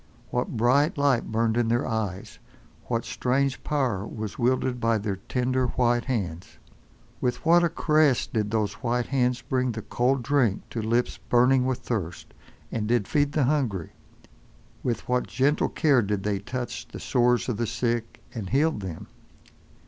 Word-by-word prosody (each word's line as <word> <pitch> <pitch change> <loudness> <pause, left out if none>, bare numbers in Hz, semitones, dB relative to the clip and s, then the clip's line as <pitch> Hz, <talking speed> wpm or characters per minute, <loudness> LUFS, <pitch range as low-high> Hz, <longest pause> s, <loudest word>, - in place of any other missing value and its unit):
What 125 -1 -2
bright 140 - +3
light 140 -6 +2
burned 115 +1 +1
in 120 -1 +2
their 120 +1 +1
eyes, 105 -5 -3 0.5
what 115 -1 -2
strange 130 +4 0
power 130 -10 0
was 110 -1 -6
wielded 125 0 +1
by 115 -1 +2
their 100 -2 -3
tender, 125 +5 0
white 120 -1 +1
hands! 95 -9 -3 0.6
With 125 +4 -2
what 170 +1 +6
a 170 - +3
caress 155 -5 +3
did 105 -3 -2
those 105 -2 0
white 120 -1 0
hands 125 -2 0
bring 130 0 0
the 110 -1 -6
cold 125 +4 0
drink 125 -7 +1
to 115 - -3
lips 115 +3 0
burning 125 +1 +4
with 130 -2 -1
thirst, 95 -8 -4 0.4
and 105 -2 -2
did 115 -3 +1
feed 145 -1 +1
the 150 - +2
hungry. 125 - 0 0.9
With 120 -2 -2
what 125 0 0
gentle 140 +3 +1
care 140 -5 +3
did 100 -2 -2
they 100 -2 0
touch 120 +5 -5
the - - -9
sores 125 0 +2
of 120 -5 -1
the 115 0 -1
sick, 115 -1 -2
and 105 -6 -5
healed 150 -1 +2
them! 90 -4 -6
120 Hz, 165 wpm, -26 LUFS, 110-130 Hz, 0.9 s, what